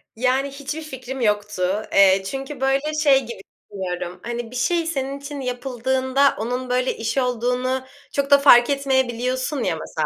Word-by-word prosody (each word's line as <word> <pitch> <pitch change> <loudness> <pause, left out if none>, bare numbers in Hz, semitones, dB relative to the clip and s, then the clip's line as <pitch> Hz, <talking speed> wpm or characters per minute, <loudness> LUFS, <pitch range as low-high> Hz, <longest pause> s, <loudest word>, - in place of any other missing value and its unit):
Yani, 260 +4 0
hiçbir 285 +3 -6
fikrim 265 -3 -7
yoktu. 205 -2 0
Eee, 195 -1 +5
çünkü, 270 +4 -6
böyle, 275 +3 +1
şey 275 -3 +6
gibi 235 -4 -8 0.3
düşünüyorum, 180 -2 -5
hani, 235 -1 -5
bir - - -9
şey 335 +7 +1
senin 275 -3 -3
için 285 0 -7
yapıldığında 260 +2 0
onun, 250 +4 -3
böyle, 250 +1 0
iş 230 +3 -3
olduğunu 250 +1 0 0.3
çok 280 0 -1
da 280 - +9
fark 245 -4 +6
etmeyebiliyorsun 260 0 0
ya, - - 0
mesela. - - -3
255 Hz, 155 wpm, -22 LUFS, 235-275 Hz, 0.3 s, da